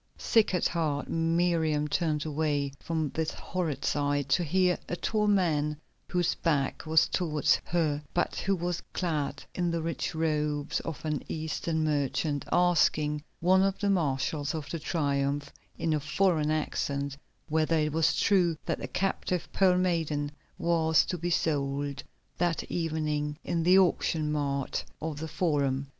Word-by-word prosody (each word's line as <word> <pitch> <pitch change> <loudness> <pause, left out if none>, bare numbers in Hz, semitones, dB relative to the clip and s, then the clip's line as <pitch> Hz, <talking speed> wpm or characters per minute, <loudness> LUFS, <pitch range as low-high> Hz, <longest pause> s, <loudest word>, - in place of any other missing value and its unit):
Sick 220 -4 +3
at 180 - +2
heart, 155 -4 -1
Miriam 165 -2 +1
turned 150 0 0
away 145 -2 -1
from 160 -3 -2
this 160 -1 -1
horrid 170 -6 -3
sight, 145 -1 0
to 145 +7 +3
hear 180 +2 +2
a - - -1
tall 210 +3 0
man, 155 -7 +2 0.3
whose 175 -1 +1
back 150 -1 -1
was 160 0 +5
towards 155 -5 +1
her, 155 -4 0
but 175 - 0
who 195 - +1
was 175 -1 -2
clad 150 -5 -2
in 175 -1 0
the 165 -1 -1
rich 165 0 -3
robes 150 -2 0
of 160 -1 -6
an 150 -1 -1
Eastern 160 0 -2
merchant, 145 0 0
asking 155 -4 +3 0.2
one 185 +2 +5
of 195 0 +1
the 200 -1 +1
marshals 145 -3 0
of 155 -2 -5
the 165 - -3
Triumph, 145 -3 -1 0.2
in 160 - 0
a 150 - +1
foreign 155 0 +1
accent, 140 -2 -1 0.3
whether 160 +1 +2
it 150 -1 +1
was 160 -1 +3
true 180 -5 +3
that - - -1
the - - -5
captive 185 -2 -1
Pearl 185 -2 +4
Maiden 160 -5 0 0.3
was 160 -2 +3
to - - -2
be 175 +2 -2
sold 140 -3 -1 0.4
that 175 -1 +1
evening 150 -3 -1
in 170 - -1
the 180 +3 +5
auction 165 -4 +2
mart 140 -2 -1 0.2
of 155 -2 -4
the 160 - -4
Forum. 140 -5 0
160 Hz, 150 wpm, -29 LUFS, 145-175 Hz, 0.4 s, was